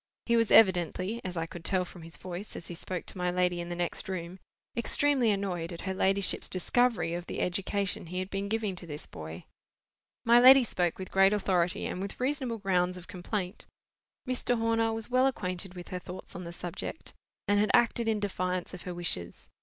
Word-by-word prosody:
He 235 - +3
was 230 -2 +3
evidently—as 185 0 +3
I 165 - -1
could 170 0 -10
tell 185 +1 +3
from 175 0 -12
his 165 +1 -9
voice, 185 +3 -7
as 170 - -8
he - - -5
spoke 180 +1 -5
to - - -1
my 180 0 +1
lady 180 -1 +1
in 170 - -6
the 175 - -3
next 175 +3 -2
room—extremely 225 +8 -1
annoyed 185 -4 -1
at 170 - -7
her 190 - -2
ladyship's 195 0 +1
discovery 225 0 +2
of 175 0 -5
the - - -4
education 190 0 -1
he 180 +2 -5
had 185 +1 -3
been 195 +1 -2
giving 215 -3 -1
to 175 - -6
this 150 -1 -5
boy. 80 +2 -9 0.8
My 235 +1 +7
lady 260 +2 +9
spoke 180 -6 -1
with 190 -1 -7
great 195 +1 +5
authority, 185 -4 +1
and 180 - -3
with 200 0 -6
reasonable 260 -3 0
grounds 185 -3 +1
of 180 - -10
complaint. 185 +1 -4 0.6
Mr. 250 -1 +1
Horner 225 0 +1
was 225 +2 -2
well 255 +1 +4
acquainted 185 -6 -3
with 175 -1 -9
her 180 - -4
thoughts 180 +1 -9
on 180 0 -6
the 170 - -6
subject, 175 - -6 0.3
and 205 0 +3
had 210 - +2
acted 235 0 +3
in 220 -1 +1
defiance 185 -3 -2
of 180 - -8
her 180 -2 -6
wishes. 150 - -4
185 Hz, 200 wpm, -30 LUFS, 175-220 Hz, 0.8 s, lady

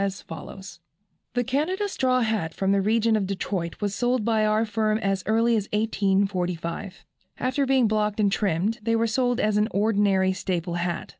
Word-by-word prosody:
as 195 -1 -2
follows: 190 +4 -10 0.6
"The 245 - +2
Canada 310 - -1
straw 255 -9 +1
hat 220 -8 -1
from 195 0 0
the 200 0 +3
region 220 +2 +2
of 200 -3 0
Detroit 185 -3 -3
was 205 -1 -1
sold 245 0 0
by 220 -2 +2
our 215 +1 +2
firm 215 0 0
as 195 -3 -1
early 230 +2 +3
as 210 -2 -2
1845. 195 -4 -1 0.3
After 260 +2 0
being 260 -3 +3
blocked 210 0 0
and 205 -2 +3
trimmed, 200 +3 0
they 230 +1 0
were 230 0 +2
sold 245 +1 0
as 210 -1 +1
an 210 +1 +2
ordinary 200 -2 +2
staple 180 -2 -3
hat. 175 0 -3
210 Hz, 175 wpm, -25 LUFS, 195-230 Hz, 0.6 s, the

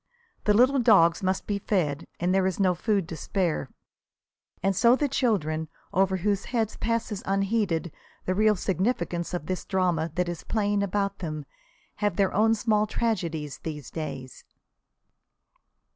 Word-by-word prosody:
The 210 - +4
little 260 +5 +5
dogs 195 -8 +5
must 190 0 -1
be 205 -1 -1
fed, 165 -9 -1
and 180 +2 +1
there 190 -1 +3
is 190 - -2
no 185 -2 +4
food 195 0 0
to 165 - -5
spare. 170 -6 -1 0.9
And 195 0 +2
so 235 +6 +5
the 290 +2 0
children, 170 - 0 0.3
over 190 0 +2
whose 200 +2 0
heads 225 -4 -1
passes 230 -3 -2
unheeded 195 -4 0 0.3
the 185 - +1
real 215 +2 +3
significance 180 -3 -1
of 175 -4 -4
this 185 +1 -3
drama 175 -4 0
that 180 -1 0
is 175 -1 -5
playing 205 -2 0
about 200 0 -1
them, 155 -4 -5 0.5
have 205 -4 0
their 195 0 +2
own 225 +2 +4
small 215 -1 +1
tragedies 170 -11 -2
these 150 -4 -7
days. 130 -5 -6
190 Hz, 150 wpm, -26 LUFS, 170-210 Hz, 0.9 s, little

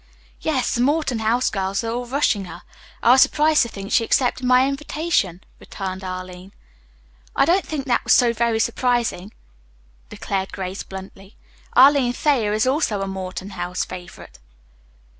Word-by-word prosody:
"Yes, - - -1
the 240 - 0
Morton 280 -3 +1
House 230 +3 +1
girls 195 +1 -2
are 225 - -2
all 245 +1 -4
rushing 240 -6 0
her. - - -11 0.4
I 235 - +6
was 260 +1 +6
surprised 305 0 +4
to 235 - 0
think 195 -2 -8
she 230 - +3
accepted 250 +2 +1
my 255 +1 +5
invitation," 275 - -1 0.2
returned 190 -1 -6
Arline. 185 0 -7 0.8
"I - - +4
don't 370 +3 +2
think 290 -4 -4
that 245 -3 +1
was - - +1
so 240 -2 +4
very 235 -1 0
surprising," 235 -4 -1 0.8
declared 195 -1 -4
Grace 190 0 -5
bluntly. 190 +1 -11 0.4
"Arline 265 -1 +5
Thayer 250 -7 +1
is 215 +2 +1
also 255 -7 0
a - - -4
Morton 190 0 -6
House 180 -1 -3
favorite." 180 - -11
225 Hz, 155 wpm, -21 LUFS, 190-255 Hz, 0.8 s, I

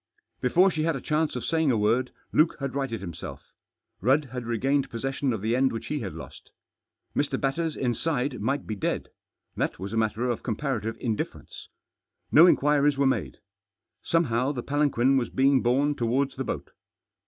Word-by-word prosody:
Before 180 +10 +4
she 155 -1 -2
had 165 -1 +1
a - - -3
chance 155 +2 0
of 125 - -4
saying 160 -2 +1
a 120 - +3
word 115 +5 +1 0.2
Luke 155 +2 +4
had 140 -2 -3
righted 135 -7 -2
himself. 85 -4 -8 0.5
Rudd 135 +8 +3
had 125 -2 -5
regained 135 +4 +1
possession 135 +3 -2
of 110 -4 -3
the 115 +2 +1
end 130 +1 +3
which 115 - -5
he 150 - -2
had 95 - -5
lost. 75 -5 -11 0.7
Mr. 145 0 0
Batters 155 +4 -1
inside 130 -1 -1
might 135 +6 -1
be 110 - -4
dead. 100 - -2 0.5
That - - -1
was 95 +4 -6
a - - -1
matter 110 +2 0
of 120 -2 -1
comparative 115 -2 -2
indifference. 115 -4 -4 0.6
No 165 +4 +8
inquiries 145 -3 +3
were 140 - +2
made. 130 - 0 0.6
Somehow 135 -6 +1
the 125 -3 -4
palanquin 135 -2 +2
was 120 -3 0
being 135 0 +3
borne 135 +5 +2
towards 130 +1 0
the 135 - -3
boat. - - -4
130 Hz, 175 wpm, -26 LUFS, 115-145 Hz, 0.7 s, No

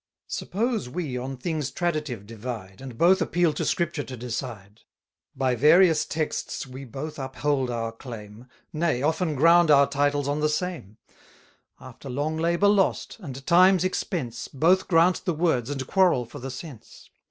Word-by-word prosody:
Suppose 225 - -2
we 150 -3 -4
on 130 +2 -4
things 150 0 -3
traditive 155 - -3
divide, 110 -3 -7
And 130 -4 -9
both 185 +6 +4
appeal 175 -3 +1
to - - -3
Scripture 170 -3 -1
to 130 -2 -8
decide; 115 -4 -6 0.5
By 130 -1 +1
various 160 +5 +5
texts 155 -1 -3
we 130 +1 -9
both 140 +5 -7
uphold 135 0 -1
our 115 -1 -3
claim, 115 -1 -10 0.3
Nay, 155 -5 0
often 160 +1 0
ground 165 +3 +5
our 140 -1 +7
titles 145 0 0
on 145 +1 -1
the 150 0 +1
same: 150 - -4 0.8
After 130 +1 -11
long 145 +5 -2
labour 170 +4 +2
lost, 200 -2 +1
and 135 -7 -8
time's 185 +1 +5
expense, 160 - -3
200 135 - -14
Both 185 +4 +4
grant 175 +1 +3
the 175 - -1
words, 150 -7 +1
and 135 -2 -3
quarrel 180 -8 +3
for 115 - -10
the 135 - -6
sense. 130 -2 -11
145 Hz, 160 wpm, -25 LUFS, 125-170 Hz, 0.8 s, our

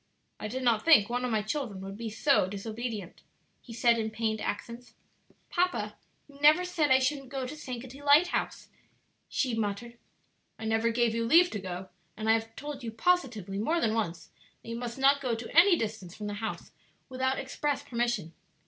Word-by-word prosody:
"I 215 - -4
did 255 +4 -4
not 230 -3 +3
think 265 -10 +6
one 245 +1 -1
of 250 - 0
my 215 -2 0
children 220 -3 -3
would 195 +1 -7
be 225 +1 -5
so 220 -2 +2
disobedient," 215 -1 -5 0.4
he 240 - -13
said, 235 0 +3
in 220 0 -1
pained 220 -1 -2
accents. 235 +4 -5 0.6
"Papa, 360 +1 0 0.3
you 280 -1 -17
never 310 +5 +6
said 330 -5 0
I 260 - +7
shouldn't 270 0 -1
go 270 -1 -3
to 255 - -6
Sankaty 260 -2 -8
Lighthouse," 290 +5 +2 0.6
she 255 -4 0
muttered. 225 +2 -3 0.6
"I 220 - -7
never 225 +1 +2
gave 230 -1 +1
you 230 0 -1
leave 345 +7 +6
to 210 - -3
go, 185 0 -6 0.3
and 215 0 -4
I 220 - +6
have 225 0 -2
told 290 -2 -7
you 230 - -3
positively, 220 - 0
more 320 +11 +1
than 220 -8 +1
once, 175 -7 -3 0.3
that - - -10
you 230 - -3
must 235 0 -5
not 275 +1 +4
go 250 -4 0
to 230 +4 -8
any 350 +2 +7
distance 210 - -5
from 210 - -7
the 205 - -3
house 220 +2 -5 0.4
without 260 0 -1
express 280 +1 -2
permission. 235 - -2
235 Hz, 190 wpm, -29 LUFS, 220-275 Hz, 0.6 s, I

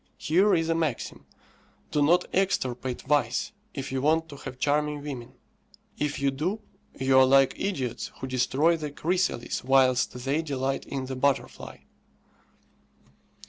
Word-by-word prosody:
Here 190 +6 +3
is 165 -1 0
a 165 - +2
maxim: 160 -7 -3 0.6
Do 150 - +1
not 175 +5 +4
extirpate 130 -10 -1
vice, 135 - +1 0.2
if 135 -1 -5
you 130 -1 -1
want 160 +3 +2
to 145 - -9
have 135 -2 -8
charming 150 +1 0
women; 130 -4 -7 0.7
if 145 -1 -1
you 140 0 +2
do 170 +11 -2 0.4
you 130 0 +4
are - - +8
like 135 0 +5
idiots 135 - -2
who - - -4
destroy 130 +6 +2
the 150 -2 -4
chrysalis 170 -3 -1
whilst 130 -1 +3
they 140 +4 +1
delight 135 -3 -2
in 135 -2 -4
the 130 0 -5
butterfly. 140 +1 -1
140 Hz, 140 wpm, -27 LUFS, 130-160 Hz, 0.7 s, are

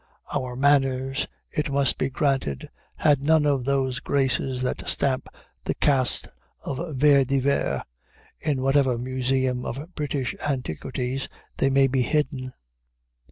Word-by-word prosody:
Our 125 -1 -2
manners, 135 -1 +2 0.2
it 150 -1 -2
must 140 -1 +2
be 130 - 0
granted, 135 - -1 0.2
had 145 -3 +2
none 155 0 +4
of 140 -4 +1
those 135 -2 0
graces 130 -2 0
that 125 - -2
stamp 130 -2 +1 0.4
the - - -1
caste 130 -4 +3 0.3
of 150 +3 -4
Vere 140 0 +5
de 135 +1 0
Vere, 140 +1 0 0.6
in 140 -4 -1
whatever 135 -2 +3
museum 130 0 -1
of 145 +9 -6
British 145 -4 -2
antiquities 130 - -2 0.3
they 135 - +2
may 135 0 +4
be 135 0 +1
hidden. 135 -2 -1
135 Hz, 130 wpm, -25 LUFS, 130-140 Hz, 0.6 s, Vere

